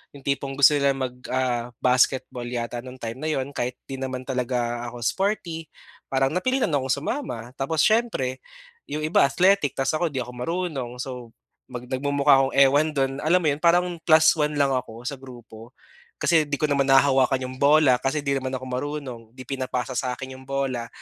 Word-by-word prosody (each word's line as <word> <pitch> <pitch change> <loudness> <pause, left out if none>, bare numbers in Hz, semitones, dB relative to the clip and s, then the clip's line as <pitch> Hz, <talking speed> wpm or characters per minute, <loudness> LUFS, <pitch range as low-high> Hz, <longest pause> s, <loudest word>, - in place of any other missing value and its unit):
Yung 140 - -13
tipong 140 -1 -2
gusto 140 +1 +7
nila 140 -1 +2
mag, 130 -2 -3 0.2
ah, 125 -2 -1
basketball 125 -1 +1
yata 120 0 -4
nung 130 +1 -11
time 115 +1 -5
na 155 - -3
'yon 135 -1 -2
kahit 125 -2 -3
'di 135 -1 -5
naman 130 -1 -4
talaga 120 -2 -2
ako 120 0 -8
sporty, 175 - -1 0.4
parang 135 0 +1
napilitan 255 +5 0
akong 135 -3 0
sumama. 125 - -4
Tapos 150 +3 0
siyempre 215 - +1 0.5
'yong 155 +1 -4
iba 155 - +4
athletic 180 0 +3
tapos 135 0 +1
ako 175 - +1
'di 130 -2 -1
ako 125 - -10
marunong 145 -2 -3
so 125 -3 -7 0.4
mag 125 0 -8
nagmumukha 140 +1 +3
akong 135 0 0
ewan 140 +3 +5
do'n, 135 -1 +1
alam 175 +4 +4
mo 160 - 0
'yon, 140 - -3
parang 175 +1 +4 0.2
plus 160 -1 +5
1 150 0 +1
lang 140 -1 +2
ako 120 -3 -4
sa 140 -2 -4
grupo. 120 -2 -13 0.5
Kasi 160 -2 +4
'di 145 - -1
ko - - +3
naman 140 -1 +2
nahahawakan 135 -1 +4
'yong 130 0 -8
bola 140 -3 +5
kasi 145 +3 -1
'di 140 -1 0
naman 130 0 -5
ako 130 - -6
marunong, 130 -1 -4
'di 130 - -9
pinapasa 130 -1 -3
sa 125 0 -1
akin 130 +1 -8
'yong 130 0 -15
bola. 135 -4 -2
135 Hz, 190 wpm, -24 LUFS, 125-145 Hz, 0.5 s, gusto